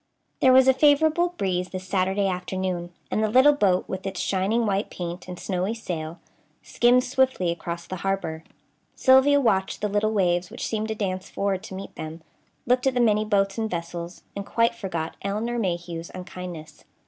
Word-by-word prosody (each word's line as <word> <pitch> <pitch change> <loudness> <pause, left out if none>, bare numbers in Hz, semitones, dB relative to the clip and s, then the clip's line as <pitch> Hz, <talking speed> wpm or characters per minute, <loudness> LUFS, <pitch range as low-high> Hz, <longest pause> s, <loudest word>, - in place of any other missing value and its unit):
There 260 - +5
was 260 0 +6
a 265 - +7
favorable 315 +5 +3
breeze 180 -1 -1
this 185 0 -7
Saturday 190 +1 +1
afternoon, 180 -1 -3 0.2
and 215 - +1
the 215 - +1
little 260 +6 +6
boat, 195 -9 +2
with 190 0 -5
its 190 - -4
shining 200 +5 +1
white 200 0 0
paint 175 0 -6
and 180 -1 -7
snowy 190 +3 -2
sail, 170 -6 -5 0.4
skimmed 245 +1 +3
swiftly 255 -9 +1
across 170 0 -5
the 185 - -6
harbor. 175 -4 -2 0.5
Sylvia 265 +2 +5
watched 195 -7 +1
the 210 - 0
little 210 +1 +1
waves 180 -3 +1
which - - -5
seemed 220 -1 -2
to 220 - -3
dance 190 -2 -3
forward 195 -2 -1
to 190 - -8
meet 195 +1 -8
them, 160 +1 -7 0.4
looked 250 +2 +2
at 265 - +1
the - - +2
many 215 -3 +3
boats 200 -1 +1
and 220 -1 -1
vessels, 170 0 -5
and 200 - -4
quite 230 +3 +1
forgot 170 -8 -4
Elinor 220 +5 -2
Mayhew's 170 -4 -3
unkindness. 180 -4 -8
195 Hz, 180 wpm, -25 LUFS, 180-230 Hz, 0.5 s, a